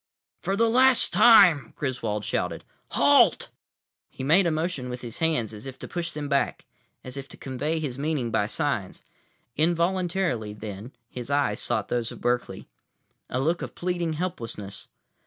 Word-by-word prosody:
"For 195 - -1
the 230 +3 +3
last 255 +2 +4
time," 185 - +6
Griswold 115 -7 -3
shouted, - - -2 0.3
"halt!" - - +4 0.6
He - - -8
made 170 +7 +4
a - - +3
motion 155 -5 -2
with 125 0 -6
his 120 +2 -7
hands, 155 -10 0
as 105 +5 -9
if 135 0 -8
to - - -8
push 170 -1 -3
them 150 -2 -5
back, 140 -1 0 0.4
as 130 +1 -7
if 135 0 -7
to - - -11
convey 145 +5 -3
his 140 -4 -4
meaning 145 -5 -1
by - - +1
signs. - - -2 0.5
Involuntarily, 170 - 0
then, 105 +2 -8 0.2
his 125 +1 -8
eyes 140 -7 +1
sought 110 -4 -1
those 120 -1 -1
of - - -10
Berkeley. 120 0 -2 0.6
A 125 - -1
look 165 +6 0
of - - -6
pleading, 175 -2 -2
helplessness. 115 - -5
140 Hz, 160 wpm, -26 LUFS, 120-170 Hz, 0.6 s, time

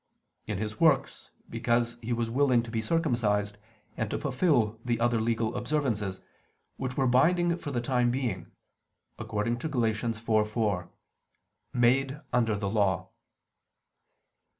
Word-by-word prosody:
In 105 -3 -2
His 105 +1 -4
works, 155 -5 +2 0.2
because 120 0 0
He 115 +1 -5
was 120 -1 0
willing 125 0 +3
to 115 - -8
be 115 -1 -1
circumcised 110 - 0 0.4
and 110 -2 -2
to - - -2
fulfil 125 - +1
the 120 -2 -1
other 120 -1 +2
legal 115 0 0
observances, 120 -7 -1 0.6
which 130 -1 -4
were 135 - +2
binding 170 +7 +3
for 145 - -5
the 125 -4 -1
time 125 0 +1
being; 125 -1 -2 0.7
according 115 +3 -2
to 155 - -3
Gal. 130 -5 0
4:4: 110 -3 0 0.8
"Made 130 +4 +2
under 115 -3 +2
the 100 -1 -2
Law." 100 -4 +1
120 Hz, 130 wpm, -28 LUFS, 110-130 Hz, 0.8 s, willing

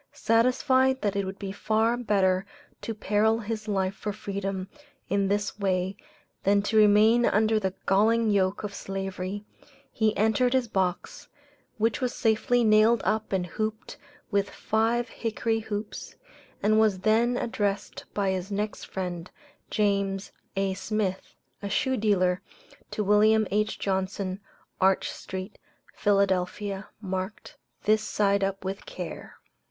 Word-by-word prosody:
Satisfied 260 +3 +3
that 205 -2 0
it 200 -1 0
would 190 +1 -6
be 195 -1 -5
far 220 +3 +1
better 195 -6 +2 0.4
to 225 - -4
peril 215 +1 +2
his 220 -1 -5
life 195 -2 0
for 210 +1 -4
freedom 195 -2 -4 0.4
in 200 0 +1
this 205 +1 -1
way 190 -1 0 0.5
than 200 +1 +3
to 210 - -2
remain 215 +2 +6
under 220 0 +3
the 190 -2 -2
galling 220 +3 +3
yoke 195 0 +1
of 205 -1 -4
Slavery, 195 +1 -5 0.5
he 220 -1 +1
entered 220 +4 +2
his 260 -2 +2
box, 190 -4 -2 0.5
which 225 +3 +1
was 250 -1 -1
safely 235 +2 +2
nailed 215 +1 +5
up 220 0 0
and 190 -2 0
hooped 215 - -4 0.3
with 200 -1 +1
five 230 +2 0
hickory 225 0 -2
hoops, 210 -1 -6 0.5
and 215 +1 +4
was 215 -3 +3
then 230 +4 +3
addressed 205 -4 -2
by 200 -2 +1
his 190 +1 -3
next 210 +1 -3
friend, 180 -2 -5 0.4
James 200 -2 0 0.2
A. 195 0 0
Smith, 190 0 -3 0.3
a 200 - -4
shoe 260 +3 +1
dealer, 185 -5 +2 0.5
to 210 - -2
Wm. 215 +2 +4
H. 215 +2 0
Johnson, 190 0 -2 0.4
Arch 190 0 +3
street, 190 +2 -7 0.3
Philadelphia, 195 0 0
marked, 190 0 -5 0.3
"This 215 +1 +3
side 200 -2 +1
up 195 0 -2
with 195 - -5
care." - - -7
205 Hz, 135 wpm, -27 LUFS, 195-220 Hz, 0.5 s, remain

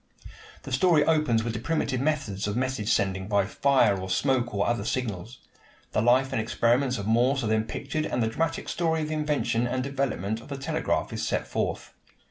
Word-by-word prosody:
The - - -8
story 150 +3 +4
opens 150 -9 +2
with 115 0 -3
the 110 - -3
primitive 130 -1 -1
methods 135 -10 -1
of 105 +2 -2
message 130 -4 -1
sending 95 -1 0
by 100 -2 +2
fire 120 -1 +3
or 95 - -6
smoke 120 +4 +1
or 100 -1 0
other 120 -3 0
signals. 115 -1 -3 0.5
The - - +1
life 130 +3 +3
and 115 - +1
experiments 120 +3 +1
of 100 - -5
Morse 125 +5 +2
are - - -1
then 110 0 +1
pictured 155 +6 -3
and 125 - 0
the - - +1
dramatic 165 +8 -2
story 160 -2 0
of 150 - -4
the - - -2
invention 150 -6 0
and 130 +1 -1
development 130 -6 -2
of - - -14
the 140 -2 -5
telegraph 155 +4 -1
is - - -3
set - - -1
forth. - - -3
125 Hz, 200 wpm, -27 LUFS, 110-140 Hz, 0.5 s, story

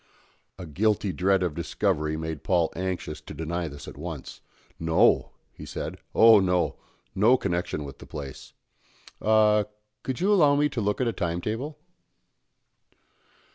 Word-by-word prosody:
A 90 - -7
guilty 100 +4 0
dread 95 0 +2
of 90 -4 -1
discovery 80 -2 -1
made 80 -2 -5
Paul 85 -3 +1
anxious 90 -4 -4
to - - -10
deny 85 +3 -3
this 70 -1 -10
at - - -9
once. 80 -4 -7 0.4
"No," 80 0 +3 0.2
he - - -11
said; - - -6 0.2
"oh 115 -2 +8
no; 90 -2 +1 0.4
no 110 +7 +5
connection 85 -6 -2
with 70 -2 -9
the - - -12
place. 70 -3 -8 0.7
Ah, 105 -1 +4 0.4
could 130 -2 -4
you 200 +3 +3
allow 150 -7 +5
me 150 +1 +2
to 125 -5 -3
look 105 +3 0
at 125 - +1
a 115 - 0
time 85 -2 -2
table?" 125 - -4
90 Hz, 150 wpm, -26 LUFS, 80-110 Hz, 0.7 s, oh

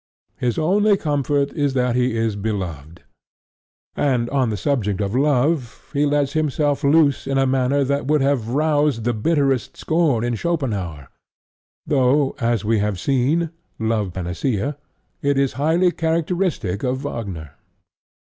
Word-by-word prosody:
His 120 -2 -1
only 200 +6 +3
comfort 145 -3 0
is 145 -4 0
that 125 -2 +1
he 125 -2 +1
is 115 -2 0
beloved. 90 -7 -5 0.9
And 125 -5 0
on 135 -4 +1
the 105 - -2
subject 105 -4 -1
of 100 0 -2
love 140 -1 0
he 145 0 +2
lets 145 -1 +1
himself 150 -2 0
loose 140 -1 +3
in 135 0 0
a 135 - +3
manner 135 +2 +1
that 140 0 -1
would 150 0 +2
have 135 -5 +1
roused 145 -3 +1
the 120 +1 +1
bitterest 135 +2 0
scorn 155 -8 +1
in 120 0 0
Schopenhaur, 105 - -3 0.8
though, 135 0 +2
as 115 -4 0
we 110 0 +2
have 105 -2 -1
seen 140 - +1 0.3
(Love 110 -4 -1
Panacea), 95 - -2 0.5
it 140 -1 +1
is 135 -1 +1
highly 160 +7 +2
characteristic 165 - -1
of 130 +1 -1
Wagner. 95 - -5
135 Hz, 140 wpm, -21 LUFS, 110-145 Hz, 0.9 s, only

